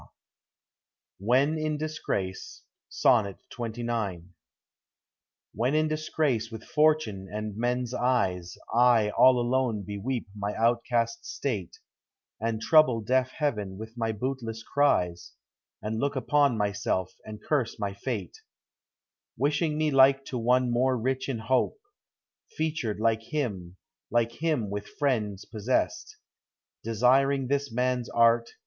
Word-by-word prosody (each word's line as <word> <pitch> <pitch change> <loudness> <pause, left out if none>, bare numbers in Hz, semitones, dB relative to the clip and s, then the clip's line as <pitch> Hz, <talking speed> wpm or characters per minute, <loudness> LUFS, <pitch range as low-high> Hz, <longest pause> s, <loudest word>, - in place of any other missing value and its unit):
J - - -18 1.1
WHEN 135 +9 +2
IN 155 -1 -1
DISGRACE. 145 -12 -4 0.3
SONNET 100 -5 +2 0.2
XXIX. 115 -7 -3 1.2
When 125 +5 0
in 155 0 +3
disgrace 155 -7 -1
with 110 -1 -8
fortune 150 -11 +1
and 105 -1 -4
men's 125 +2 -1
eyes, 100 -9 0
1 115 -3 +4
all 130 +3 +5
alone 120 -3 0
beweep 110 +5 -3
my 105 0 -3
outcast 115 0 +1
state, 105 -11 -4 0.6
And 115 0 -1
trouble 130 -4 +5
deaf 130 +4 +1
Heaven 105 -10 -2
with 110 +2 -9
my 115 -2 -1
bootless 115 -1 -4
cries, 90 -13 +1 0.5
And 110 +1 -2
look 140 +2 -1
upon 140 -1 +2
myself, 100 -3 -1
and 110 -1 -9
curse 135 +1 -1
my 100 -1 -3
fate, 100 -3 -5 1.0
Wishing 150 +3 +1
me 155 -1 +1
like 135 0 +5
to 125 - -4
one 125 +1 +2
more 130 +2 +2
rich 130 +3 -2
in 130 - -1
hope, 125 - 0 0.8
Featured 155 -10 -2
like 110 0 +2
him, 105 - -4 0.3
like 115 -1 +1
him 145 -8 -1
with 100 0 -4
friends 110 -9 -1
pos 105 0 -9
sessed, 325 - 0 0.7
Desiring 130 +4 +2
this 140 -2 0
man's 125 +1 0
art. 115 0 +3
120 Hz, 125 wpm, -27 LUFS, 105-135 Hz, 1.2 s, all